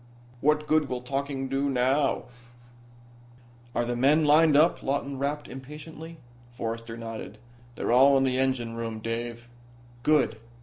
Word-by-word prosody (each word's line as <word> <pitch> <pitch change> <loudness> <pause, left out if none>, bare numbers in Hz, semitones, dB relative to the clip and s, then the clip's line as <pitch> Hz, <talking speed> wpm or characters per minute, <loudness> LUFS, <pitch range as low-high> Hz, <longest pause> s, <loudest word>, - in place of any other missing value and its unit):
What 150 +3 +2
good 155 -1 +2
will 125 -1 -3
talking 135 +1 -3
do 135 +1 0
now?" 135 +2 +1 1.5
"Are 120 - +1
the 120 0 -2
men 145 +6 +3
lined 150 0 +5
up?" 160 +3 +4
Lawton 140 0 -2
rapped, 145 +2 -2
impatiently. 155 +4 -10 0.3
Forrester 115 -1 -5
nodded. 115 -2 -7 0.4
"They're - - -2
all 135 +3 +6
in 135 - +2
the 130 -1 +1
engine 130 -3 0
room, 115 -1 -4
Dave." 115 +1 -5 0.5
"Good. 140 -5 +2
135 Hz, 135 wpm, -27 LUFS, 120-145 Hz, 1.5 s, all